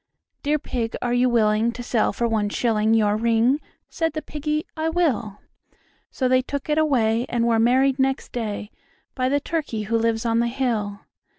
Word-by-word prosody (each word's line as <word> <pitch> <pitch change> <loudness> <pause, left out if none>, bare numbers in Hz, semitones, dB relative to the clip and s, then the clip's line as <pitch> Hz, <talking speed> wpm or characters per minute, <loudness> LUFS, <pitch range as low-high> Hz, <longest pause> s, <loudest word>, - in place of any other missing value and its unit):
"Dear 300 +1 +1
Pig, 240 -6 -3
are 245 0 0
you 250 +1 +3
willing 220 -1 +2
to 245 +1 -7
sell 235 -2 +1
for 235 +3 -1
one 215 -2 0
shilling 220 0 +1
Your 210 -2 +3
ring?" 230 +5 +2 0.3
Said 325 -2 -2
the 310 -1 -4
Piggy, 300 +1 -3
"I 320 0 -1
will." 270 - 0 0.7
So 260 - -1
they 255 0 +4
took 280 +2 -5
it 300 +1 +2
away, 240 -6 +2
and 235 -1 0
were 230 -1 +2
married 260 +3 +3
next 265 0 0
day 215 -3 -4 0.4
By 255 -1 0
the 285 +1 +2
Turkey 290 -8 -3
who 225 +3 0
lives 225 0 0
on 230 0 +2
the 235 - +2
hill. 225 -5 -2
240 Hz, 185 wpm, -23 LUFS, 225-275 Hz, 0.7 s, they